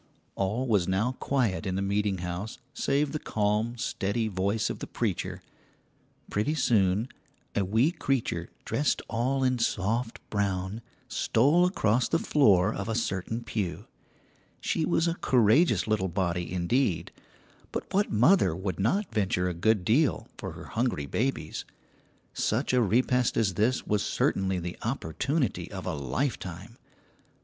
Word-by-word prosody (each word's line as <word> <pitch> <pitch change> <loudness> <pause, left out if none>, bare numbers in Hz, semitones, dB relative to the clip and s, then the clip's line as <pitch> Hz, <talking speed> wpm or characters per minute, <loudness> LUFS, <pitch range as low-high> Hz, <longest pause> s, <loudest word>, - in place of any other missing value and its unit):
All 105 +7 -1
was 100 -7 +2
now 100 +6 +1
quiet 115 -8 0
in 95 - -1
the 95 - -1
meeting 100 0 0
house 90 +5 -4 0.2
save 140 +1 +1
the 155 - -2
calm, 110 +2 0
steady 110 0 -1
voice 100 +2 0
of - - -7
the - - -6
preacher. - - -3 0.9
Pretty 110 +10 0
soon 105 -5 +2 0.5
a 100 - +1
wee 110 - +2
creature 135 -8 -1 0.2
dressed 145 - 0
all 130 +4 0
in 130 -1 +2
soft 115 +2 -1
brown 100 +1 -1 0.3
stole 150 +10 +3
across 120 - +1
the 165 - +3
floor 105 - +4
of 100 +3 -4
a 110 - -1
certain 115 +1 -2
pew. 100 -6 -3 0.7
She 160 - 0
was 170 0 +2
a 170 - +1
courageous 115 - +4
little 105 -3 +1
body 85 -1 -1
indeed, 90 +3 0 0.6
but - - -3
what 200 +2 +2
mother 115 - +4
would 95 -1 -4
not 190 - 0
venture 95 -4 +1
a - - -2
good 95 +2 +1
deal 135 - +2
for - - -6
her - - -10
hungry 115 - -1
babies? 130 - -2 0.7
Such 125 +5 0
a 125 - +4
repast 125 +3 +2
as 105 -5 +2
this 110 +7 +1
was 105 -1 +1
certainly 95 -1 0
the 90 0 -5
opportunity 125 - -1
of - - -6
a - - -2
lifetime. 90 - -3
110 Hz, 145 wpm, -28 LUFS, 95-125 Hz, 0.9 s, floor